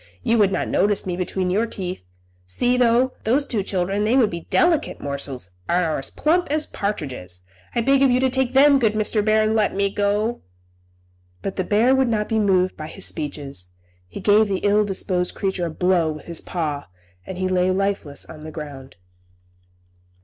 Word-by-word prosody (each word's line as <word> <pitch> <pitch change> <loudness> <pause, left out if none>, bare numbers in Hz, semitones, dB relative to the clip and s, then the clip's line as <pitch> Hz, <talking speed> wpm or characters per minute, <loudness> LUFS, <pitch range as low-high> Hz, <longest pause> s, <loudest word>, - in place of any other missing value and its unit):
You 230 0 +2
would 200 -2 +4
not - - -1
notice 205 0 +1
me 180 -2 -2
between 180 0 -2
your 215 +5 +1
teeth. 185 - -5 0.4
See, 245 - +1
though, 250 +1 +3
those 265 +6 +2
two 225 -7 -1
children, 195 +1 -1
they 220 +4 +2
would 235 -5 +3
be 170 -1 -7
delicate 340 -4 +2
morsels, 140 -8 -5 0.2
and 175 0 +2
are 155 -3 -1
as 135 - -4
plump 350 +3 +1
as 305 +1 0
partridges; 130 - -5 0.3
I 235 - +2
beg 275 +3 +3
of 275 - +5
you 250 0 +3
to 260 0 +2
take 260 -1 0
them, 280 +1 +6
good 220 -4 +2
Mr. 215 0 0
Bear, 215 0 +3
and 215 +1 +1
let 215 -3 +1
me 200 0 +1
go." 210 +3 0 1.0
But 195 - -3
the 185 - -1
bear 220 +7 +3
would 265 -1 +3
not 210 -2 0
be 225 -1 0
moved 185 -3 +2
by 155 - -7
his 190 +4 -7
speeches. 145 - -4 0.4
He 90 - -8
gave 210 +1 +4
the 195 -2 -2
ill 205 +1 +4
disposed 185 -2 -2
creature 190 -3 -1
a - - -4
blow 175 -1 +1
with 150 - -11
his 170 -2 -3
paw, 150 -5 -3 0.4
and 185 - -6
he 185 0 -1
lay 185 0 +2
lifeless 190 -6 -1
on 155 -1 -11
the 155 - -7
ground. 145 -4 -9
195 Hz, 195 wpm, -22 LUFS, 170-225 Hz, 1.0 s, them